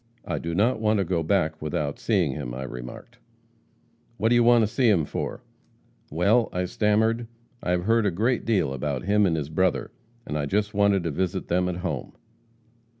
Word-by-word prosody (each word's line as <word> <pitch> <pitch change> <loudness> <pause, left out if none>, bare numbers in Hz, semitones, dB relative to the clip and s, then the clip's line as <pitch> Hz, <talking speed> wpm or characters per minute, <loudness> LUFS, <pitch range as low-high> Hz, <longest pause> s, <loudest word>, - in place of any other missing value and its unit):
I - - -2
do 85 0 -4
not 110 +5 +2
want 110 0 +2
to 100 - +2
go 90 -2 -1
back 80 -2 0
without 75 -1 -3
seeing 95 -10 +1
him,' - - -5
I 65 - -5
remarked. 60 -1 -9 1.0
'What 110 +3 +1
do 120 - +4
you 120 - +5
want 120 -1 +5
to - - +2
see 120 +3 +2
him 85 -8 +3
for?' - - -5 0.7
'Well,' 100 +9 +2
I 90 0 -1
stammered, 110 +4 +1 0.3
'I - - -4
have 90 0 +1
heard 115 +1 +2
a - - +3
great 110 +7 0
deal 100 -12 +1
about 70 0 -3
him 100 +1 +3
and 85 - +1
his 75 -1 -3
brother, 95 +3 0 0.3
and 75 - -3
I 70 - -2
just 105 +5 0
wanted 100 -2 +3
to 85 - -2
visit 90 +4 -2
them 90 +1 +1
at 90 - -3
home.' 75 -8 -4
95 Hz, 200 wpm, -25 LUFS, 80-110 Hz, 1.0 s, you